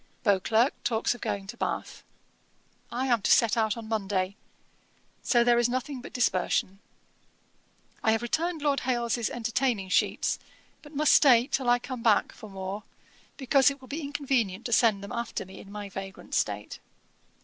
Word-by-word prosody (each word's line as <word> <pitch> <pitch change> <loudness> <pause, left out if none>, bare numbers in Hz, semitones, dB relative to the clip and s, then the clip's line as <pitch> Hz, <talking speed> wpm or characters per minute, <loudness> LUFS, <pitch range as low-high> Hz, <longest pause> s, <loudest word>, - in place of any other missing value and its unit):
Beauclerk 220 +5 +3
talks 225 0 +1
of 245 - -12
going 200 -1 -3
to 195 - -8
Bath. - - -4 0.9
I 255 +2 -1
am 240 -4 +2
to - - 0
set 230 -3 +5
out 220 -1 +1
on 225 -1 -7
Monday; 195 -3 -1 0.9
so 240 -2 +3
there 240 0 +4
is 240 0 +2
nothing 255 +1 -3
but - - -10
dispersion. 195 -4 0 1.2
'I 220 - +4
have 225 +1 -1
returned 320 +5 -1
Lord 285 -2 +2
Hailes's 240 -2 -1
entertaining 235 -3 -1
sheets, - - +1 0.4
but 295 0 -14
must 300 +1 +4
stay 245 -5 +6
till 265 -2 -1
I 245 - +5
come 250 0 -7
back 220 -3 +3
for 215 - -12
more, 195 +1 -5 0.6
because 270 0 +4
it 280 0 -7
will 260 - -14
be 300 +5 -4
inconvenient 265 -8 -1
to 235 - -1
send 215 -4 +3
them 200 - -8
after 235 -4 -4
me 190 +1 -12
in 200 - -12
my 205 0 -6
vagrant 195 0 -8
state. 105 0 -2
235 Hz, 170 wpm, -28 LUFS, 200-255 Hz, 1.2 s, stay